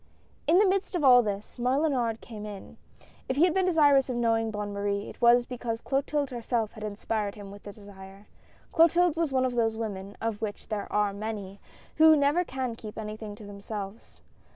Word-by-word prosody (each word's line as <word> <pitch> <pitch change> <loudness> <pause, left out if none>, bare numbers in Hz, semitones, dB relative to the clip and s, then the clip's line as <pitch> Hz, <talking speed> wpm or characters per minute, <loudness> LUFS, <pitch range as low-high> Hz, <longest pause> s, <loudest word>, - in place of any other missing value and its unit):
In 340 - +5
the 415 - +6
midst 385 0 0
of 340 - -1
all 250 -2 +8
this, 205 +2 -5
Mellunard 250 -3 0
came 215 -3 -9
in; 205 -2 -9 0.5
if 260 - 0
he 295 - +4
had 350 -2 +4
been 375 -1 +1
desirous 290 -6 +4
of 250 - -2
knowing 225 -1 +1
Bonne 210 -1 -4
Marie, 200 0 -2
it - - -11
was 240 0 +5
because 240 -2 -4
Clotilde 280 +1 -1
herself 235 -2 -2
had 215 - -10
inspired 210 0 -3
him 200 -2 -10
with 200 0 -11
the 205 - -9
desire. 200 -1 -13 0.5
Clotilde 335 0 +4
was 330 -3 0
one 260 -1 +2
of 255 - -1
those 225 -2 +1
women, 200 -3 -5
of 225 -2 -3
which 210 -2 -5
there 210 -2 -4
are 210 -1 +1
many, 200 -2 -6 0.4
who 315 0 +8
never 290 +4 +2
can 260 -6 -4
keep 215 -2 -10
anything 215 -1 -6
to 210 - -12
them 200 0 -10
selves. 205 0 -8
225 Hz, 200 wpm, -28 LUFS, 205-270 Hz, 0.5 s, all